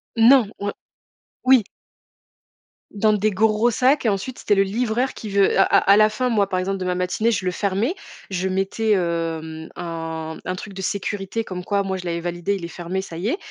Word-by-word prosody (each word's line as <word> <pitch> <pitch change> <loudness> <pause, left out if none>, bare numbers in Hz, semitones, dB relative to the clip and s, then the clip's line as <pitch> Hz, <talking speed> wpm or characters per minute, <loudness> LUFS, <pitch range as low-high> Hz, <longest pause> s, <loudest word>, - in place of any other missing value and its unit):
Non, 230 -1 +6
o 205 0 -2 0.7
oui. 255 -3 +6 1.3
Dans 215 +1 +2
des 210 +1 +2
gros 215 +3 +2
sacs 255 +2 +2
et - - +5
ensuite, 205 +6 -3
c'était 205 - +2
le 195 - +4
livreur 235 +5 -1
qui 215 - -7
veut 195 -1 +3
à - - +8
à 200 - +4
la 215 0 +5
fin, 250 +4 -1
moi, 205 -4 +2
par 185 - -1
exemple 195 +1 -2
de 185 - -3
ma 180 0 0
matinée, 180 +5 0
je 200 -5 -1
le 180 - +1
fermais. 200 - 0 0.4
Je 190 0 -1
mettais, 195 +3 +1
heu, 170 -2 -1
mmh, 160 0 -8
un 165 -2 -5
un 185 - -3
truc 200 +2 -8
de 190 - -6
sécurité 200 +3 -2
comme 180 -3 -6
quoi, 200 +1 0
moi, 190 -1 -2
je 180 - -8
l'avais 170 -1 -2
validé. 175 +3 -2
Il 180 -3 -5
est - - -4
fermé, 175 +2 -4
ça 170 - -9
y 190 +5 -2
est 340 - 0
195 Hz, 215 wpm, -22 LUFS, 180-215 Hz, 1.3 s, à